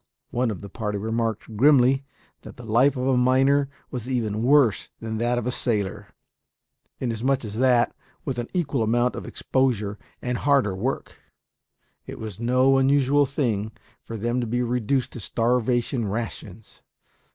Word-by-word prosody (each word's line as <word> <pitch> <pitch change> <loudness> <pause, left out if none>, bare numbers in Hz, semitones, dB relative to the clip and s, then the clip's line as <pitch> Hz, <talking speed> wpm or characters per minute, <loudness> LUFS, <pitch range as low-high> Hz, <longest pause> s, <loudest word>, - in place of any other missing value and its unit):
One 120 0 0
of 105 - -5
the 100 - -8
party 105 0 -3
remarked 110 +1 -2
grimly 135 +1 +5 0.4
that - - -12
the 120 - -10
life 125 +5 +3
of 125 - -1
a 135 -1 +3
miner 135 +3 +3 0.2
was 125 -1 -5
even 110 -4 -1
worse 130 -3 +3
than 110 -1 -4
that 120 +1 +1
of 120 - -2
a 125 - 0
sailor; 105 -7 -1 0.9
inasmuch 125 +2 -1
as 105 +1 -5
that, 125 -2 +3 0.3
with 130 -4 -2
an 120 - -3
equal 150 -8 -1
amount 120 +3 +2
of - - -6
exposure 110 -6 -1 0.2
and 125 -1 -3
harder 140 -9 +2
work, 125 +8 -3 0.9
it - - -7
was 110 -4 -7
no 130 +3 +3
unusual 140 +1 +3
thing 115 -7 -1 0.3
for 115 - -7
them 120 +3 -1
to 120 - -3
be 120 +2 0
reduced 125 +2 0
to - - -7
starvation 120 +1 0
rations. 105 -1 -6
120 Hz, 155 wpm, -24 LUFS, 110-130 Hz, 0.9 s, grimly